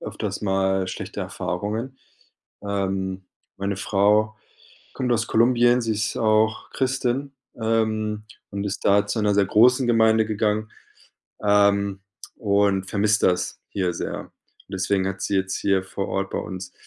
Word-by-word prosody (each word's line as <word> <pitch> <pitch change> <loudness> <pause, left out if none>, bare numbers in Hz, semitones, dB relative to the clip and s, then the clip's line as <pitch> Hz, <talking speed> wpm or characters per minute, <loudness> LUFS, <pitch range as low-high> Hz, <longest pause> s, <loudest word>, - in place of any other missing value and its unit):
öfters - - -5
mal 95 -1 +1
schlechte - - -6
Erfahrungen. 115 +6 -4 0.7
Ähm, 95 -2 -2 0.3
meine 100 0 -2
Frau 105 +2 +2 0.6
kommt 125 -2 -1
aus 115 0 +1
Kolumbien, 120 +1 +4
sie 115 -1 0
ist 110 +2 -2
auch 110 0 +2
Christin, 130 +1 -1 0.3
ähm, 110 -1 0 0.3
und 100 0 -4
ist 100 -1 -4
da 100 +1 +4
zu 110 - -1
'ner 105 -1 +2
sehr 100 -1 +3
großen 125 +5 +4
Gemeinde 110 -1 +4
gegangen, 110 0 -1 0.7
ähm, 100 -1 +3 0.4
und 100 -2 +2
vermisst 105 +1 +2
das 90 -1 +1
hier 90 -3 -1
sehr. - - -5 0.4
Deswegen 95 0 0
hat 95 0 -5
sie 100 - -1
jetzt 95 0 -1
hier 95 -1 +1
vor 95 +1 -4
Ort 95 0 -2
bei - - -2
uns 95 -1 -7
105 Hz, 140 wpm, -23 LUFS, 95-110 Hz, 0.7 s, Kolumbien